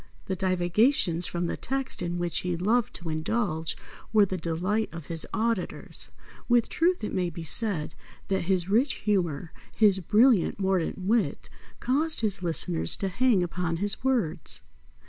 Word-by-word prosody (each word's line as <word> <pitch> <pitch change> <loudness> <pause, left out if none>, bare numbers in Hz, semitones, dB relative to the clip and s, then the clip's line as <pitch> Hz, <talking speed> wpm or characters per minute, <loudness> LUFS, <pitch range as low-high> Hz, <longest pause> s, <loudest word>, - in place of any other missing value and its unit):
The 190 - -2
divagations 185 - +2
from 175 0 -2
the - - -2
text 270 -2 -3
in 175 0 -2
which 175 -1 0
he 180 -1 -2
loved 220 +6 +1
to 170 -2 -4
indulge 160 0 -1 0.3
were 215 -2 +5
the 185 - -3
delight 185 +6 -1
of 165 -3 -8
his 165 0 -6
auditors. 230 +1 -1 0.4
With 240 -1 +3
truth 350 -4 +1
it 210 - -3
may 180 -2 0
be 165 0 -7
said 165 -3 0 0.3
that 190 -3 -1
his 185 -1 +1
rich 240 +8 +2
humour, 175 -6 -1 0.2
his 205 -3 +4
brilliant, 215 +3 +3
mordant 190 -3 0
wit, 210 +4 0 0.3
caused 300 +5 +1
his 200 -4 -1
listeners 85 - +1
to 195 - -2
hang 220 -1 +2
upon 175 -1 -2
his 205 +6 -2
words. 215 -11 0
190 Hz, 155 wpm, -27 LUFS, 170-225 Hz, 0.4 s, were